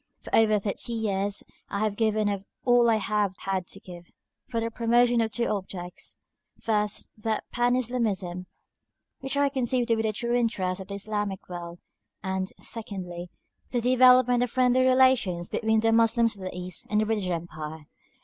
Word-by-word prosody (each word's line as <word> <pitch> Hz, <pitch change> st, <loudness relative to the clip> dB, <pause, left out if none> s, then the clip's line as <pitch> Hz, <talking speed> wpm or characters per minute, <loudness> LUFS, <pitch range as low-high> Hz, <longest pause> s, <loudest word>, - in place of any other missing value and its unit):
For -, -, -2 dB
over 215 Hz, -1 st, +5 dB
thirty 205 Hz, +3 st, -2 dB
years 205 Hz, -3 st, -1 dB, 0.3 s
I 200 Hz, -, -2 dB
have 215 Hz, -2 st, 0 dB
given 215 Hz, -1 st, +1 dB
of 200 Hz, -1 st, -2 dB, 0.2 s
all 245 Hz, -1 st, +5 dB
I 225 Hz, -, +4 dB
have 210 Hz, -2 st, 0 dB
had 190 Hz, -2 st, -2 dB
to 195 Hz, -, -5 dB
give, 175 Hz, -2 st, -11 dB, 0.4 s
for 230 Hz, -2 st, -1 dB
the 230 Hz, 0 st, -2 dB
promotion 240 Hz, +1 st, +3 dB
of 225 Hz, -1 st, 0 dB
two 235 Hz, +2 st, -1 dB
objects: 185 Hz, -4 st, -5 dB, 0.4 s
first, 210 Hz, -2 st, -1 dB
that 220 Hz, 0 st, -1 dB
Pan 245 Hz, 0 st, +2 dB
Islamism, 210 Hz, -8 st, -2 dB, 0.7 s
which 270 Hz, +1 st, -3 dB
I 285 Hz, 0 st, +4 dB
conceive 255 Hz, -2 st, 0 dB
to 230 Hz, -1 st, +2 dB
be 220 Hz, -, 0 dB
the 220 Hz, -1 st, 0 dB
true 235 Hz, +3 st, -2 dB
interest 200 Hz, -6 st, 0 dB
of 190 Hz, -, -9 dB
the 200 Hz, -, -5 dB
Islamic 205 Hz, -1 st, -3 dB
world; 175 Hz, -1 st, -7 dB, 0.5 s
and, 190 Hz, 0 st, -2 dB
secondly, 180 Hz, -6 st, -5 dB, 0.4 s
the 245 Hz, -, 0 dB
development 250 Hz, 0 st, +5 dB
of 245 Hz, -, +1 dB
friendly 255 Hz, +1 st, +3 dB
relations 255 Hz, -9 st, +3 dB
between 220 Hz, -1 st, +1 dB
the 225 Hz, 0 st, +3 dB
Moslems 230 Hz, 0 st, +3 dB
of 190 Hz, -2 st, -9 dB
the 185 Hz, -, -5 dB
East 180 Hz, -1 st, -4 dB
and 210 Hz, -, +2 dB
the 215 Hz, -, +2 dB
British 210 Hz, -4 st, -1 dB
Empire. 160 Hz, -2 st, -5 dB
215 Hz, 175 wpm, -27 LUFS, 190-240 Hz, 0.7 s, over